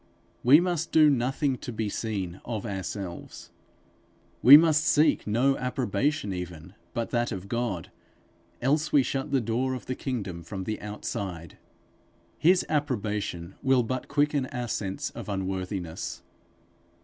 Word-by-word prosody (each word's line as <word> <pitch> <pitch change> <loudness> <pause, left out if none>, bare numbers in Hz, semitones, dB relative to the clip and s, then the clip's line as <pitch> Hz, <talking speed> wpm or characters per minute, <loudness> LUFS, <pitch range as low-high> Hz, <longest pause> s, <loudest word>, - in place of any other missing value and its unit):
We 135 +5 +8
must 175 -2 -1
do 155 -2 +6
nothing 135 +1 0
to 125 - -6
be 110 -1 -2
seen 100 -4 -4
of 110 -3 -4
ourselves. 95 -2 -6 0.9
We 135 +5 +11
must 155 -1 +4
seek 155 -4 +3
no 125 +6 +3
approbation 125 -2 -1
even, 90 -1 -7 0.2
but 115 -2 -2
that 120 0 0
of 95 -2 -5
God, 115 -6 -3 0.7
else 150 +4 +1
we 140 -2 +5
shut 135 +3 -2
the 135 - +3
door 125 +3 -1
of 125 - -8
the 130 - -2
kingdom 100 -11 -4
from 95 +3 -6
the 110 +2 -4
outside. 95 -5 -5 0.8
His 180 +3 +4
approbation 105 - -2
will 130 -2 +3
but 130 +2 -3
quicken 145 -2 +1
our 125 -4 -4
sense 95 -2 -3
of - - -8
unworthiness. 95 -3 -4
120 Hz, 135 wpm, -27 LUFS, 95-135 Hz, 0.9 s, We